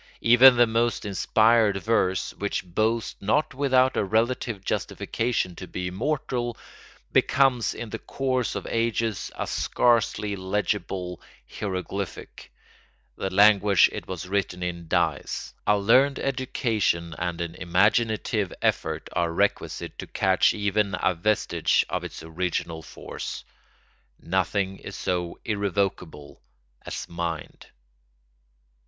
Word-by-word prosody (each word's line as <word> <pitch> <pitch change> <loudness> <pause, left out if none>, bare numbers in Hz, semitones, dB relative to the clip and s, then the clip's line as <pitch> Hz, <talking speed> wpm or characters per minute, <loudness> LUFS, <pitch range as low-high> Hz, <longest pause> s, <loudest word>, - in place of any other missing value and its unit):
Even 125 +2 +8
the 120 - +7
most 115 0 0
inspired 110 +1 +3
verse, 95 -3 0
which 100 -1 -2
boasts 110 +6 -1
not 135 +11 +1
without 130 -1 +3
a - - +1
relative 110 0 -1
justification 115 -6 -2
to 90 - -8
be 90 0 -4
immortal, 120 +2 -2 0.5
becomes 130 -4 +3
in 115 -3 -7
the 115 - -4
course 130 -3 -2
of - - -4
ages 115 -3 -1
a - - -3
scarcely 115 -3 +1
legible 95 -2 -2 0.3
hieroglyphic; 95 +2 -5 0.6
the 95 - -3
language 100 0 +5
it - - -6
was 90 -1 -5
written 95 -2 -2
in 85 -1 -4
dies, - - -1
a 105 - +4
learned 130 +7 +4
education 115 -10 -1
and 90 -1 -2
an 85 -1 -3
imaginative 105 +3 +1
effort - - -1
are 85 -1 0
requisite 85 - -1
to - - -6
catch 95 -1 +3
even 100 -1 0
a 95 - +2
vestige 105 +5 +1
of - - -2
its - - -8
original 80 0 -3
force. - - -7 0.8
Nothing 95 +2 -1
is - - -8
so 90 -1 -2
irrevocable 100 -7 -2 0.5
as - - -5
mind. 85 -2 -5
100 Hz, 115 wpm, -25 LUFS, 90-115 Hz, 0.8 s, Even